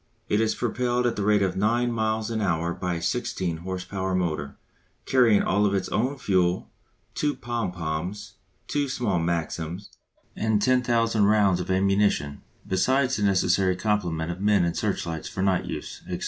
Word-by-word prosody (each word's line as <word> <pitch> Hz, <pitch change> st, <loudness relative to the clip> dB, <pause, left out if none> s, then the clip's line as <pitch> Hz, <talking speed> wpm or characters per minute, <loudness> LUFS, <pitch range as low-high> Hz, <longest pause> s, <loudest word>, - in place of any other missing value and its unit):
It 105 Hz, -, +2 dB
is 110 Hz, -, +1 dB
propelled 125 Hz, +1 st, 0 dB
at 120 Hz, -, +1 dB
the 105 Hz, -, -3 dB
rate 105 Hz, 0 st, +3 dB
of 95 Hz, -2 st, 0 dB
nine 120 Hz, +5 st, +1 dB
miles 110 Hz, 0 st, -1 dB
an 110 Hz, -1 st, -1 dB
hour 85 Hz, -3 st, 0 dB
by 90 Hz, 0 st, -3 dB
a 85 Hz, -, -4 dB
16 95 Hz, -5 st, -1 dB
horse 90 Hz, +2 st, -5 dB
power 95 Hz, -1 st, -2 dB
motor, 75 Hz, -6 st, -2 dB, 0.5 s
carrying 120 Hz, -5 st, +4 dB
all 105 Hz, +2 st, +2 dB
its 95 Hz, -, -1 dB
own 130 Hz, +7 st, 0 dB
fuel, 95 Hz, -6 st, 0 dB, 0.4 s
two 145 Hz, -1 st, 0 dB
pom 120 Hz, -6 st, -3 dB
poms, 90 Hz, +4 st, -4 dB, 0.3 s
two 145 Hz, -1 st, -1 dB
small 110 Hz, -8 st, 0 dB
Maxims, 85 Hz, +2 st, -3 dB, 0.4 s
and 110 Hz, -1 st, +1 dB
10,000 115 Hz, -3 st, +2 dB
rounds 100 Hz, -3 st, +3 dB
of 90 Hz, -, -5 dB
ammunition, 95 Hz, -6 st, +1 dB, 0.3 s
besides 130 Hz, +8 st, +2 dB
the -, -, -3 dB
necessary 95 Hz, -1 st, +2 dB
complement 90 Hz, -5 st, -1 dB
of 90 Hz, +2 st, -7 dB
men 100 Hz, -3 st, +3 dB
and 85 Hz, -, -1 dB
searchlights 80 Hz, -2 st, -2 dB
for 95 Hz, -, -3 dB
night 95 Hz, -2 st, +1 dB
use, -, -, -6 dB
&c. -, -, -3 dB
100 Hz, 165 wpm, -25 LUFS, 90-115 Hz, 0.5 s, carrying